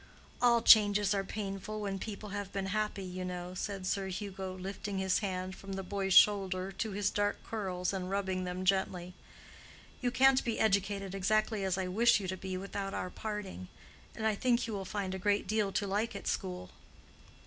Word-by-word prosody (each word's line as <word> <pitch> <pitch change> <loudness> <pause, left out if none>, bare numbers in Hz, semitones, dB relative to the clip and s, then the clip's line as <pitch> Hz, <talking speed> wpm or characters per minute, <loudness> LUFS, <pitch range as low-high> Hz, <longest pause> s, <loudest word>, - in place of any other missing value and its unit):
"All 235 -2 +5
changes 205 -2 +7
are 195 -1 0
painful 200 +1 -5
when 200 -2 -3
people 210 0 -6
have 200 0 -4
been 195 -1 -2
happy, 210 -2 -1
you 185 0 -5
know," 180 0 -5
said 195 0 -4
Sir 195 0 -1
Hugo, 190 -1 -5
lifting 195 +1 -5
his 190 -1 +2
hand 185 -2 -3
from 195 0 -8
the 195 0 -3
boy's 195 0 -1
shoulder 195 -2 +5
to 220 +2 -3
his 205 0 0
dark 205 0 0
curls 185 -4 -2
and 185 -1 -3
rubbing 190 -2 -1
them 180 +1 -4
gently. 185 -2 0 0.9
"You 245 - +2
can't 265 +1 +5
be 230 -2 -2
educated 200 -2 +1
exactly 215 +2 +1
as 190 -1 0
I 190 - -1
wish 220 +5 +4
you 195 - -4
to 185 - -1
be 185 0 -4
without 195 +1 -4
our 180 - -3
parting. 210 - -5 0.5
And 220 - -3
I 220 - +3
think 240 +3 +1
you 225 - -4
will 195 -2 -3
find 195 -2 -3
a 190 - -4
great 205 +1 +1
deal 210 0 0
to 205 - 0
like 205 +4 -1
at - - -7
school." 90 0 -3
195 Hz, 190 wpm, -32 LUFS, 185-210 Hz, 0.9 s, changes